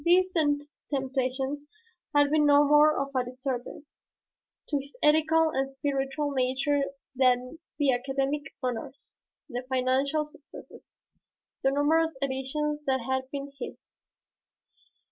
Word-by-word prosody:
These 370 Hz, +2 st, +4 dB, 0.6 s
temptations 265 Hz, +1 st, -2 dB, 0.5 s
had 290 Hz, 0 st, +5 dB
been 300 Hz, -1 st, +4 dB
no 290 Hz, 0 st, +6 dB
more 300 Hz, +1 st, +6 dB
of 275 Hz, 0 st, -3 dB
a 255 Hz, -, +2 dB
disturbance 255 Hz, +3 st, -6 dB, 0.6 s
to 290 Hz, -, 0 dB
his 280 Hz, +1 st, -11 dB
ethical 315 Hz, +1 st, +4 dB
and 270 Hz, -2 st, -1 dB
spiritual 275 Hz, +1 st, -2 dB
nature 265 Hz, +2 st, +1 dB, 0.3 s
than 255 Hz, +3 st, +2 dB, 0.2 s
the 285 Hz, -3 st, +3 dB
academic 270 Hz, +3 st, -1 dB, 0.2 s
honors, 255 Hz, +2 st, -5 dB, 0.3 s
the 245 Hz, 0 st, -4 dB
financial 265 Hz, +4 st, +1 dB
successes, 295 Hz, -1 st, -14 dB, 0.7 s
the 270 Hz, -, +3 dB
numerous 310 Hz, +2 st, +2 dB
editions 275 Hz, +3 st, -2 dB
that 265 Hz, -1 st, +2 dB
had 260 Hz, +2 st, -2 dB
been 280 Hz, 0 st, -5 dB
his. -, -, -9 dB
275 Hz, 115 wpm, -28 LUFS, 265-295 Hz, 0.7 s, no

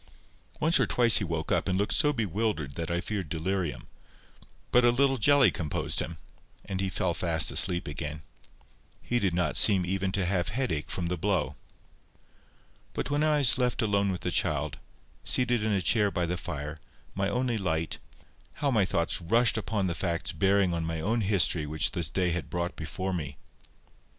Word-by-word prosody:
Once 160 Hz, +2 st, +3 dB
or -, -, +2 dB
twice 120 Hz, -2 st, +5 dB
he -, -, -2 dB
woke 80 Hz, -3 st, -3 dB
up, -, -, +1 dB
and 95 Hz, -1 st, 0 dB
looked 100 Hz, +1 st, +1 dB
so 150 Hz, -, +4 dB
bewildered 105 Hz, -, -2 dB
that 85 Hz, +4 st, -4 dB
I 85 Hz, 0 st, -1 dB
feared 95 Hz, -5 st, -4 dB
delirium; 85 Hz, +1 st, -3 dB, 0.9 s
but 125 Hz, -, +5 dB
a 120 Hz, -, +6 dB
little 135 Hz, +2 st, +2 dB
jelly 140 Hz, +3 st, +5 dB
composed 75 Hz, -3 st, -2 dB
him, 85 Hz, 0 st, -3 dB, 0.5 s
and 95 Hz, -1 st, -3 dB
he 95 Hz, -, -1 dB
fell 90 Hz, -1 st, -1 dB
fast 85 Hz, -2 st, +1 dB
asleep 90 Hz, -2 st, +3 dB
again. 75 Hz, +1 st, -5 dB, 0.8 s
He 120 Hz, -, -1 dB
did 95 Hz, -6 st, 0 dB
not 90 Hz, -3 st, 0 dB
seem 95 Hz, -4 st, +5 dB
even 95 Hz, +1 st, -1 dB
to 100 Hz, -3 st, 0 dB
have 90 Hz, -2 st, 0 dB
headache 100 Hz, -, -2 dB
from 90 Hz, -, -3 dB
the 90 Hz, +1 st, -2 dB
blow. 85 Hz, -7 st, -1 dB, 1.4 s
But -, -, -3 dB
when 145 Hz, +1 st, +1 dB
I 155 Hz, -1 st, +3 dB
was 135 Hz, -2 st, +3 dB
left 125 Hz, -1 st, 0 dB
alone 100 Hz, -2 st, +1 dB
with 90 Hz, -, -5 dB
the -, -, -2 dB
child, -, -, 0 dB, 0.5 s
seated 125 Hz, -2 st, +1 dB
in 110 Hz, 0 st, 0 dB
a 100 Hz, -3 st, 0 dB
chair 105 Hz, +5 st, +3 dB
by 90 Hz, -3 st, -1 dB
the 85 Hz, +1 st, -2 dB
fire, 75 Hz, -2 st, -6 dB, 0.3 s
my 95 Hz, 0 st, -1 dB
only 125 Hz, -2 st, -1 dB
light, 80 Hz, -4 st, -2 dB, 0.5 s
how 140 Hz, -1 st, -1 dB
my 110 Hz, -6 st, +3 dB
thoughts 85 Hz, -1 st, 0 dB
rushed 115 Hz, +8 st, +3 dB
upon 105 Hz, -2 st, -1 dB
the 90 Hz, -, -1 dB
facts 85 Hz, -1 st, -2 dB
bearing 95 Hz, -2 st, +2 dB
on 85 Hz, -1 st, -2 dB
my 80 Hz, 0 st, -3 dB
own 110 Hz, +8 st, 0 dB
history 95 Hz, -6 st, +1 dB
which 80 Hz, +1 st, +1 dB
this 85 Hz, -4 st, -2 dB
day 90 Hz, -2 st, 0 dB
had 85 Hz, 0 st, -4 dB
brought 85 Hz, 0 st, -3 dB
before 95 Hz, +4 st, -4 dB
me! 75 Hz, -6 st, -5 dB
95 Hz, 185 wpm, -28 LUFS, 85-110 Hz, 1.4 s, a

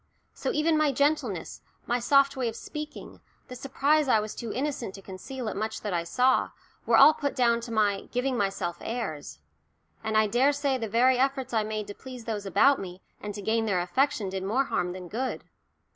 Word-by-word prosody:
So -, -, -3 dB
even 310 Hz, +1 st, +2 dB
my 305 Hz, -2 st, +3 dB
gentleness, 275 Hz, -, -1 dB, 0.2 s
my 240 Hz, +1 st, 0 dB
soft 275 Hz, +3 st, +4 dB
way 255 Hz, -3 st, -1 dB
of 225 Hz, -, -8 dB
speaking, 300 Hz, +4 st, -8 dB, 0.3 s
the 250 Hz, -, -7 dB
surprise 280 Hz, +3 st, +1 dB
I 225 Hz, -4 st, +4 dB
was 215 Hz, 0 st, -4 dB
too 230 Hz, -2 st, -6 dB
innocent 260 Hz, -7 st, -3 dB
to 195 Hz, -, -10 dB
conceal 225 Hz, +7 st, -7 dB
at 215 Hz, -, -3 dB
much 220 Hz, +2 st, -3 dB
that 205 Hz, -3 st, -3 dB
I 170 Hz, -1 st, -1 dB
saw, 255 Hz, +8 st, +2 dB, 0.4 s
were -, -, +5 dB
all 310 Hz, -, +9 dB
put 285 Hz, -2 st, -3 dB
down 235 Hz, -2 st, +2 dB
to 230 Hz, 0 st, -7 dB
my 205 Hz, -3 st, 0 dB
"giving 250 Hz, +1 st, 0 dB
myself 195 Hz, -5 st, -1 dB
airs." 155 Hz, -, -5 dB, 0.7 s
And 220 Hz, 0 st, 0 dB
I 215 Hz, -, +5 dB
daresay 270 Hz, +4 st, +1 dB
the 225 Hz, -2 st, -4 dB
very 250 Hz, +4 st, +3 dB
efforts 265 Hz, -2 st, 0 dB
I 220 Hz, -2 st, +2 dB
made 215 Hz, 0 st, -3 dB
to 205 Hz, -, -8 dB
please 250 Hz, 0 st, -10 dB
those 210 Hz, -3 st, -4 dB
about 265 Hz, +9 st, +4 dB
me 185 Hz, -1 st, -8 dB, 0.2 s
and 205 Hz, -1 st, -6 dB
to 205 Hz, -, -7 dB
gain 225 Hz, +2 st, +1 dB
their 190 Hz, -4 st, +1 dB
affection 225 Hz, +4 st, 0 dB
did 190 Hz, 0 st, -4 dB
more 220 Hz, +8 st, +1 dB
harm 180 Hz, -9 st, -2 dB
than 180 Hz, -1 st, -8 dB
good. 250 Hz, +8 st, -3 dB
235 Hz, 205 wpm, -27 LUFS, 205-270 Hz, 0.7 s, all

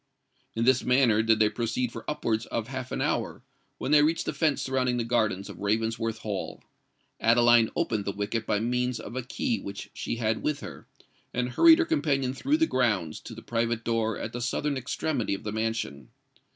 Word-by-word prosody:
In 115 Hz, +1 st, 0 dB
this 130 Hz, 0 st, +4 dB
manner 125 Hz, -4 st, +4 dB
did 110 Hz, 0 st, +3 dB
they 110 Hz, -1 st, +4 dB
proceed 115 Hz, +3 st, -2 dB
for 115 Hz, -, -7 dB
upwards 120 Hz, -7 st, -1 dB
of 115 Hz, +1 st, -3 dB
half 130 Hz, -1 st, -5 dB
an -, -, -2 dB
hour, -, -, -1 dB, 0.3 s
when -, -, -3 dB
they 150 Hz, -1 st, +7 dB
reached 160 Hz, +3 st, +1 dB
the -, -, -2 dB
fence 155 Hz, -4 st, +1 dB
surrounding 130 Hz, -2 st, 0 dB
the 120 Hz, -, 0 dB
gardens 110 Hz, -5 st, 0 dB
of -, -, -10 dB
Ravensworth 110 Hz, +2 st, -1 dB
Hall. 105 Hz, -3 st, -5 dB, 0.6 s
Adeline 120 Hz, 0 st, +5 dB
opened 105 Hz, -3 st, -1 dB
the 100 Hz, -, -1 dB
wicket 105 Hz, +3 st, -3 dB
by 105 Hz, -, +1 dB
means 125 Hz, +2 st, -1 dB
of -, -, -8 dB
a 130 Hz, -, -1 dB
key 230 Hz, -, -2 dB
which 100 Hz, 0 st, -8 dB
she -, -, -3 dB
had 110 Hz, -1 st, -1 dB
with 150 Hz, -1 st, -1 dB
her, -, -, -9 dB, 0.5 s
and 125 Hz, 0 st, 0 dB
hurried 320 Hz, -, +7 dB
her 340 Hz, -, +2 dB
companion 140 Hz, -, 0 dB
through 280 Hz, -, +1 dB
the 320 Hz, -, +3 dB
grounds 105 Hz, -, 0 dB
to -, -, -10 dB
the -, -, -11 dB
private 115 Hz, 0 st, -1 dB
door 115 Hz, -2 st, 0 dB
at 115 Hz, -, -5 dB
the 120 Hz, -, -4 dB
southern 140 Hz, +4 st, -1 dB
extremity 130 Hz, -3 st, -2 dB
of -, -, -10 dB
the 105 Hz, -, -3 dB
mansion. 110 Hz, -, -3 dB
115 Hz, 200 wpm, -27 LUFS, 110-130 Hz, 0.6 s, they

